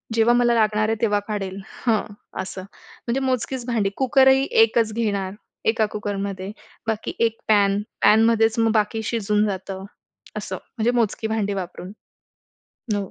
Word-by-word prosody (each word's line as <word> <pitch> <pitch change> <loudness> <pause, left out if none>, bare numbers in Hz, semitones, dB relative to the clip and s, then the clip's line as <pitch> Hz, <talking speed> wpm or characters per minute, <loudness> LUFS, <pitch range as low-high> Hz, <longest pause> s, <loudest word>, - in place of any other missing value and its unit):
जेव्हा 230 +1 +4
मला 240 -1 +3
लागणार 215 -1 +2
आहे 225 - +1
तेव्हा 210 -2 +2
काढेल. 195 -3 -4 0.3
हं, 215 -2 +1 0.3
असं. 185 0 -6
म्हणजे 235 +5 -6
मोजकीच 255 -1 -1
भांडी 225 -5 0
कुकरही 265 +1 +4 0.2
एकच 225 -1 +1
घेणार, 200 -4 -1 0.3
एका 220 0 +3
कुकरमध्ये 200 -2 -4 0.4
बाकी 220 -1 -2
एक 225 -1 +1
पॅन. 205 -1 +3 0.2
पॅनमध्येच 225 +1 +4
मग 225 -1 +3
बाकी 220 +1 0
शिजून 210 -2 +1
जातं, 190 -1 -5 0.5
असं. - - -4 0.2
म्हणजे 230 +2 +2
मोजकी 230 -2 0
भांडी 215 -2 -1
वापरून. 185 -1 -6 1.1
हो. 200 -2 -4
220 Hz, 135 wpm, -23 LUFS, 200-230 Hz, 1.1 s, जेव्हा